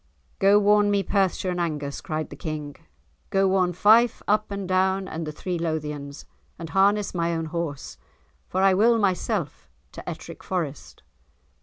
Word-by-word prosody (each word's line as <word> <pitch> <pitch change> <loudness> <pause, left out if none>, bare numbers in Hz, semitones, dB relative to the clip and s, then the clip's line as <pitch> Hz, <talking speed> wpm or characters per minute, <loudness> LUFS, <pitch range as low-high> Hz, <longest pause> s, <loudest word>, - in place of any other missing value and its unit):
"Go 200 +1 +5
warn 210 0 +4
me 200 -1 +2
Perthshire 190 -1 0
and 180 - -3
Angus," 150 -4 -3
cried 155 0 -4
the - - -7
King, 150 -1 -5 0.5
"go 195 0 +2
warn 185 -1 +2
Fife 220 +6 +4
up 215 +1 +1
and 200 -2 -4
down 190 +1 +1
and 160 -2 -5
the - - -3
three 175 +3 -4
Lothians, 150 -3 -4 0.3
and 165 -1 -8
harness 200 +1 +2
my 170 -1 0
own 165 0 -2
horse, 160 -3 -5 0.5
for 190 +1 0
I 195 -1 +5
will 230 +5 +4
myself 195 - -1 0.2
to - - -8
Ettrick - - -9
Forest." 160 -7 -5
185 Hz, 160 wpm, -25 LUFS, 155-200 Hz, 0.5 s, Go